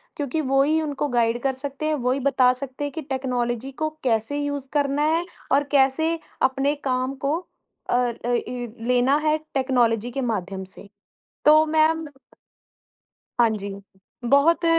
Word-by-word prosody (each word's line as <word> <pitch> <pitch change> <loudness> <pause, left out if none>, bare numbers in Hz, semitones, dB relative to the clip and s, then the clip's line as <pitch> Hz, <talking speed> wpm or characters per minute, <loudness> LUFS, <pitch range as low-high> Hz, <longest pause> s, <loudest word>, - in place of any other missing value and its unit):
क्योंकि 290 +2 -2
वो 270 -1 +2
ही 315 +3 +2
उनको 295 -1 -2
गाइड 240 -2 +1
कर 270 -1 +1
सकते 280 +3 -6
हैं, 310 - +1
वो 250 -3 0
ही 265 - 0
बता 260 -2 +4
सकते 270 +1 -6
हैं 290 - -2
कि 320 - -4
टेक्नोलॉज़ी 255 -2 -2
को 310 - +1
कैसे 235 +4 0
यूज़ 285 -2 -3
करना 285 0 +1
है 335 +1 0 0.3
और 280 +2 +4
कैसे 290 +4 +2 0.2
अपने 270 +2 +2 0.2
काम 255 +1 0
को 295 +4 +2 0.5
अ - - +2
अ, 245 -1 0
इ 245 0 -2 0.2
लेना 250 +3 +3
है 305 0 +3 0.2
टेक्नोलॉज़ी 245 -4 +1
के 270 +2 -3
माध्यम 195 -5 -3
से। 190 +2 -14 0.6
तो 310 +1 +7
मैम 315 +1 +2 1.3
हाँ 235 -1 +6
जी, 205 -2 -4 0.6
बहुत 330 +5 +4
270 Hz, 160 wpm, -24 LUFS, 245-290 Hz, 1.3 s, तो